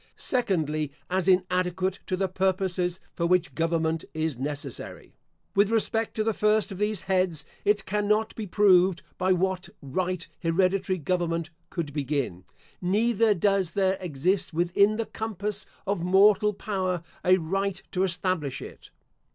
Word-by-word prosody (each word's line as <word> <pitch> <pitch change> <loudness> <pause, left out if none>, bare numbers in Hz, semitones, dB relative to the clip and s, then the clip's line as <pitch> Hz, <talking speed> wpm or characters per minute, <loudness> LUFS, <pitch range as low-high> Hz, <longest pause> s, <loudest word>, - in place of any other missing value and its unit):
Secondly, 155 - 0 0.2
As 185 0 +1
inadequate 185 0 +1
to 185 - -1
the 195 0 +1
purposes 185 -1 0
for 170 - 0
which 180 -1 +2
government 165 -1 0
is 160 -2 -1
necessary. 145 +3 -6 0.4
With 200 +1 +4
respect 225 0 0
to 215 - +1
the 225 0 +1
first 210 0 +2
of 190 - -7
these 210 -2 -1
heads 185 -6 0 0.2
It 205 -1 +2
cannot 210 +2 +1
be 215 -2 -5
proved 185 -2 +4 0.2
by 185 +1 +2
what 185 0 -1
right 180 +5 -2
hereditary 185 +3 +1
government 170 0 -1 0.2
could 160 -5 -4
begin; 140 - -2 0.4
neither 215 +3 +3
does 195 -1 +1
there 190 -1 +2
exist 175 +2 -1
within 190 +5 +3
the 230 - -1
compass 210 -2 -4 0.2
of 195 -3 -1
mortal 205 +3 +5
power 185 -4 -2 0.2
a 185 +1 +5
right 190 +2 -1
to 185 - -1
establish 175 -5 -1
it. - - -11
185 Hz, 140 wpm, -27 LUFS, 170-200 Hz, 0.4 s, mortal